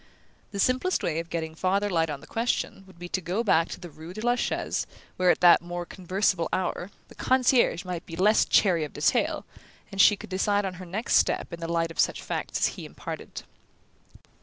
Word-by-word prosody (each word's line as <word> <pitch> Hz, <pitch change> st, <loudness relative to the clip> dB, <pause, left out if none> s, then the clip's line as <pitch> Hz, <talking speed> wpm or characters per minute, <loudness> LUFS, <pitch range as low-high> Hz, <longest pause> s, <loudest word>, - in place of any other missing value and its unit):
The 200 Hz, -, -7 dB
simplest 255 Hz, -, +1 dB
way 160 Hz, -1 st, 0 dB
of 165 Hz, 0 st, -6 dB
getting 160 Hz, -1 st, -3 dB
farther 190 Hz, +5 st, 0 dB
light 165 Hz, -4 st, +1 dB
on 145 Hz, -2 st, -5 dB
the -, -, -13 dB
question 225 Hz, -4 st, -2 dB
would 190 Hz, -, -17 dB
be 175 Hz, +1 st, -7 dB
to 185 Hz, -, -1 dB
go 185 Hz, +7 st, -1 dB
back 165 Hz, -6 st, +3 dB
to -, -, -7 dB
the 175 Hz, -3 st, -10 dB
rue 160 Hz, +4 st, -11 dB
de 215 Hz, -, -5 dB
la 240 Hz, -, +4 dB
Chaise, 245 Hz, -, -2 dB, 0.3 s
where, 185 Hz, 0 st, +2 dB
at -, -, +3 dB
that 175 Hz, -1 st, +7 dB
more 175 Hz, 0 st, -5 dB
conversable 185 Hz, -1 st, -1 dB
hour, 185 Hz, 0 st, -2 dB, 0.2 s
the -, -, -15 dB
concierge 250 Hz, -7 st, +2 dB
might 180 Hz, -2 st, -5 dB
be 165 Hz, -, -7 dB
less 210 Hz, +5 st, +4 dB
chary 175 Hz, -6 st, +3 dB
of 150 Hz, -, -6 dB
detail; -, -, +1 dB, 0.5 s
and 195 Hz, -, +2 dB
she 205 Hz, -, +7 dB
could 195 Hz, -, -12 dB
decide 205 Hz, +2 st, +1 dB
on 190 Hz, -, -3 dB
her 185 Hz, -, -9 dB
next 210 Hz, +7 st, +1 dB
step -, -, +1 dB
in 170 Hz, -, -6 dB
the 165 Hz, 0 st, -4 dB
light 165 Hz, -1 st, 0 dB
of -, -, -12 dB
such -, -, +1 dB
facts -, -, -3 dB
as -, -, +5 dB
he -, -, -8 dB
imparted. -, -, -8 dB
180 Hz, 215 wpm, -27 LUFS, 170-205 Hz, 0.5 s, that